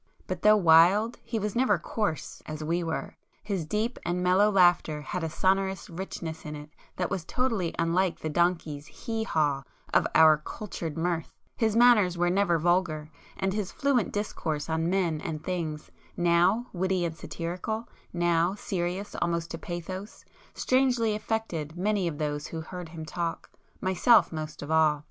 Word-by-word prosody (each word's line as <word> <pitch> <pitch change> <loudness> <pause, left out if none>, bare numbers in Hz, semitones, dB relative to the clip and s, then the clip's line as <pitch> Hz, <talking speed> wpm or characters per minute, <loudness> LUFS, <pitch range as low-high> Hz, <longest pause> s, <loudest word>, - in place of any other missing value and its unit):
But 185 -2 -4
though 215 0 +6
wild 185 +6 +5
he 230 - -3
was 210 0 -2
never 235 -5 +3
coarse,—as 160 -4 -4
we 170 +3 0
were; 165 -1 -4 0.3
his 190 -7 -3
deep 220 +7 -1
and 180 +1 -1
mellow 185 +4 +4
laughter 175 -6 +3
had 175 +5 -4
a 160 - -1
sonorous 190 +2 0
richness 165 -2 -6
in 150 0 -6
it 150 +1 -10 0.2
that 180 -1 -2
was 190 -4 -2
totally 225 -4 -1
unlike 170 +2 +1
the - - -4
donkey's 160 -3 0
'hee 225 -1 -4
haw' 145 -7 +1 0.3
of - - +4
our 155 -1 +7
'cultured' 165 -2 -6
mirth,—his 175 +6 -2
manners 220 -7 +5
were 175 0 +2
never 185 -3 +2
vulgar; 165 -2 0 0.3
and 190 0 0
his 205 -3 -2
fluent 275 -6 +1
discourse 160 -7 -3
on 160 +1 0
men 175 -5 0
and 155 -1 -4
things, 165 -4 -4 0.3
now 175 +7 +3
witty 185 -1 0
and 165 -1 -3
satirical, 180 +8 -4 0.2
now 175 +1 +1
serious 185 0 -3
almost 170 -1 -1
to 165 - -5
pathos, 185 +5 -7 0.3
strangely 250 -4 +2
affected 195 -8 -3
many 200 0 +1
of 155 -3 -4
those 150 -1 -2
who 160 - -5
heard 180 +1 -8
him 160 -1 -7
talk, 170 +2 -4 0.3
myself 190 +5 +4
most 155 -2 -6
of 145 - -6
all. 155 -2 +4
175 Hz, 160 wpm, -28 LUFS, 160-200 Hz, 0.3 s, our